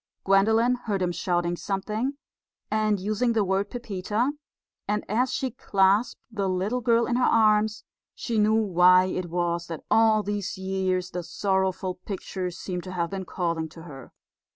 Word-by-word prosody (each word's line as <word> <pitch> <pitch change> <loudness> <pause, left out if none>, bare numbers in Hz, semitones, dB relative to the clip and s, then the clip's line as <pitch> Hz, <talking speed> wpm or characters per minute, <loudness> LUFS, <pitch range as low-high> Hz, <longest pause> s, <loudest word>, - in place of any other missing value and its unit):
Gwendolen 220 +5 +4
heard 205 -3 -1
him 175 - 0
shouting 175 0 -1
something 210 +8 -2 0.6
and 215 -1 +1
using 215 +5 0
the 220 -2 +2
word 195 +1 0
Pepita; 220 +1 -2 0.6
and 210 +1 -1
as 245 +5 +1
she 260 -1 -2
clasped 200 -1 +2
the 200 -3 -1
little 195 +7 -1
girl 235 0 +3
in 240 - 0
her 255 - +1
arms 215 -1 +3 0.3
she 230 -3 -2
knew 215 +1 +4
why 185 -3 +5
it 185 -1 -3
was 170 0 -1
that 165 -2 -7
all 220 -1 +4
these 205 -1 -3
years 190 -1 -1
the 180 - -3
sorrowful 190 0 -1
picture 185 0 -5
seemed 180 0 -5
to 185 - -7
have 170 -1 -2
been 190 -1 -4
calling 170 -3 -2
to 165 +1 -12
her. 135 -6 -11
195 Hz, 160 wpm, -26 LUFS, 180-215 Hz, 0.6 s, why